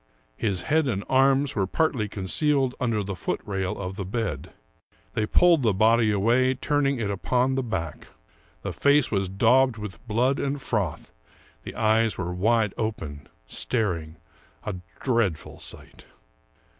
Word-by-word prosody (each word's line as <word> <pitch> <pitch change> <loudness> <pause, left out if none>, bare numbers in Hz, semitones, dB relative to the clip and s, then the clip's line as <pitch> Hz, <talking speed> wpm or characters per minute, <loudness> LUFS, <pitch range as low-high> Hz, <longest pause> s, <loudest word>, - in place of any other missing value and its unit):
His 95 - -1
head 155 -1 +2
and 100 -6 -1
arms 135 +1 +3
were 95 -3 +1
partly 125 - 0
concealed 130 - 0
under 115 -4 0
the 100 0 -4
foot - - -2
rail 95 -2 -2
of 95 0 -5
the 100 - -3
bed. 110 +3 -3 0.6
They 105 - 0
pulled 170 +4 +5
the 110 -6 +2
body 110 +2 +4
away, 120 +6 +2
turning 140 0 0
it 105 -3 -1
upon 125 +6 +1
the 135 - 0
back. 95 -10 -4 0.6
The - - -3
face 140 -1 +3
was 95 -3 0
daubed 120 +5 +3
with 105 -2 -8
blood 125 +5 +1
and 140 +1 -1
froth, 105 - -2 0.5
the - - -9
eyes 110 0 +2
were 90 -1 -3
wide 105 +2 +2
open, 80 -11 -4 0.2
staring 85 - -1 0.3
— - - -32
a 105 -3 -3 0.2
dreadful 110 - -1
sight - - -10
110 Hz, 150 wpm, -25 LUFS, 95-130 Hz, 0.6 s, pulled